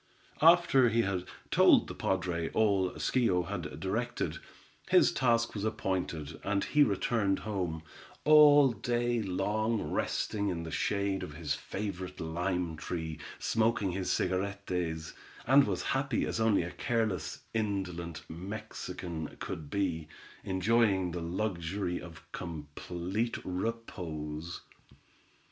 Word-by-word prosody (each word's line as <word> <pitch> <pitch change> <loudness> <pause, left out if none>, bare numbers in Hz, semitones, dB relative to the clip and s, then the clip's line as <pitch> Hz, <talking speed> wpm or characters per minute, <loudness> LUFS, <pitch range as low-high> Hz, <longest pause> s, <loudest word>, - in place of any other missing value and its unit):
After 165 -6 +6
he 115 +1 +2
had 95 -3 -1 0.3
told - - +6
the - - -6
padre 90 -3 -1
all 100 -4 +3
Schio 105 -9 +2
had 80 -7 -5
directed, 115 +7 -2 0.5
his - - +6
task 115 -2 +2
was 105 - -4
appointed, 90 -8 -2
and 100 0 0
he 150 - +2
returned 100 -3 +2
home, 90 -7 -2 0.4
all 145 -3 +8
day 120 +2 0
long 105 +3 0
resting 100 -1 -1
in 85 -3 -3
the 80 - -6
shade 100 +3 0
of 75 - -7
his 75 -2 -2
favorite 95 -3 -5
lime 85 0 -2
tree, 80 -2 -4 0.2
smoking 110 -4 +1
his 95 +1 -2
cigarettés, 90 -4 -1 0.3
and 135 +1 +6
was 95 -3 -1
happy 135 -3 0
as - - -2
only 110 -5 +3
a 85 - -5
careless, 110 -5 -1
indolent 95 -7 -2
Mexican 85 -2 -6
could 75 -3 -5
be, 85 -5 -1 0.4
enjoying 95 -1 +2
the 85 0 -4
luxury 90 0 -2
of 80 -3 -11
complete 85 +7 -4
repose. 85 -6 -4
95 Hz, 120 wpm, -31 LUFS, 85-110 Hz, 0.5 s, all